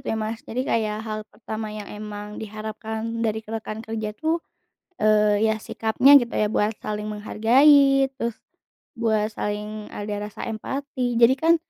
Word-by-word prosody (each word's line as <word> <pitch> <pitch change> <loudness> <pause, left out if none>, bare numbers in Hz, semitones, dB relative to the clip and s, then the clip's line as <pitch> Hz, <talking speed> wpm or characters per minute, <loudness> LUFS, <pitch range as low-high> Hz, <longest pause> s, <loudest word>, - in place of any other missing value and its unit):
gitu - - -16
ya - - -1
Mas, 225 +1 -4
jadi 245 +3 -2
kayak 215 -4 0
hal 215 -1 -3
pertama 220 0 -6
yang 210 -1 -6
emang 210 0 -7
diharapkan 220 +1 -5
dari 220 0 -1
rekan 220 0 -5
kerja 220 -1 -4
tuh, 325 +1 0 0.6
eee, 210 0 +4
ya, 220 - +2
sikapnya 225 +5 +2
gitu, 240 -2 -4
ya, 210 -1 +1
buat 215 0 +1
saling 210 0 -3
menghargai, 270 +6 +4
terus 235 -1 -2 0.6
buat 220 -2 +1
saling 210 +1 -4
ada 205 0 -4
rasa 210 - -9
empati. 250 +2 -3
Jadi 240 +3 +7
kan, 330 +2 +5
220 Hz, 155 wpm, -24 LUFS, 210-235 Hz, 0.6 s, Jadi